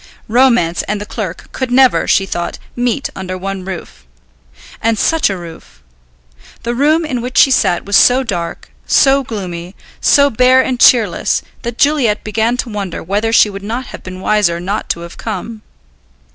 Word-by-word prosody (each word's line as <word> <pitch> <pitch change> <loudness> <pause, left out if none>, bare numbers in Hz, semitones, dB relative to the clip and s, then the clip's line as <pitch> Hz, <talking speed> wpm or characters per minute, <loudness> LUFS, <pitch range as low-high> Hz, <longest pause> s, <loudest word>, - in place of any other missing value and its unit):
Romance 235 -8 +2
and 210 0 -2
the 205 - -6
clerk 210 -5 -6
could 260 -1 -3
never, 255 +1 +4
she 195 - +3
thought, 175 -2 -4 0.2
meet 245 +3 -1
under 185 -1 -5
one 195 0 -5
roof. 185 - -8 0.8
And 225 0 +1
such 325 +5 +2
a 195 - -3
roof! 165 - -12 0.8
The 235 0 -2
room 305 +6 +2
in 255 -5 -3
which 250 +2 -5
she 270 - +6
sat 190 -8 +1
was 200 0 +3
so 255 +2 +5
dark, 175 -8 -5 0.2
so 275 0 +4
gloomy, 185 -6 -6 0.2
so 280 0 +4
bare 255 +3 +4
and 255 -2 -2
cheerless, 225 -9 +3 0.2
that 235 0 -5
Juliet 275 -8 +2
began 225 +3 0
to 250 - -3
wonder 200 -5 -5
whether 205 +5 -1
she 215 -2 +4
would 195 0 -8
not 230 +5 -4
have - - -8
been 185 0 -9
wiser 190 -5 +1
not 200 +5 -4
to 170 - -2
have 170 0 -10
come. 220 +1 -6
215 Hz, 170 wpm, -15 LUFS, 185-250 Hz, 0.8 s, she